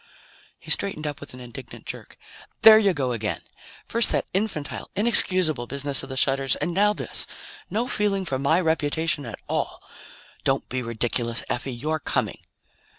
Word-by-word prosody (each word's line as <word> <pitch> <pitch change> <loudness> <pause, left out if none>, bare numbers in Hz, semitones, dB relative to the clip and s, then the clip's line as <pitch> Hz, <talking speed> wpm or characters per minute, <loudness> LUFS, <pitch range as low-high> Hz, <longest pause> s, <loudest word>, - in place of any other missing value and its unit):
He - - -8
straightened 175 -6 0
up 145 -2 -4
with 145 -3 -11
an - - -11
indignant 120 -2 -10
jerk. - - -8 0.5
"There 220 -1 +10
you 200 -3 +3
go 135 -7 -2
again! 110 -3 -3 0.5
First 230 -1 +3
that - - 0
infantile, 190 -7 -3
inexcusable 185 - +5
business 140 0 0
of 135 - -9
the 130 - -6
shutters, 135 -1 +2
and 175 - -3
now 205 +3 +3
this! - - -1 0.4
No 225 +4 -1
feeling 200 -4 0
for 135 -5 -2
my 150 +5 +2
reputation 160 -3 0
at 115 - -7
all. - - -3 0.6
Don't 135 0 0
be 130 0 -2
ridiculous, 115 0 0
Effie. 130 +2 -3
You're 155 +6 -2
coming!" - - -2
145 Hz, 160 wpm, -24 LUFS, 130-185 Hz, 0.6 s, There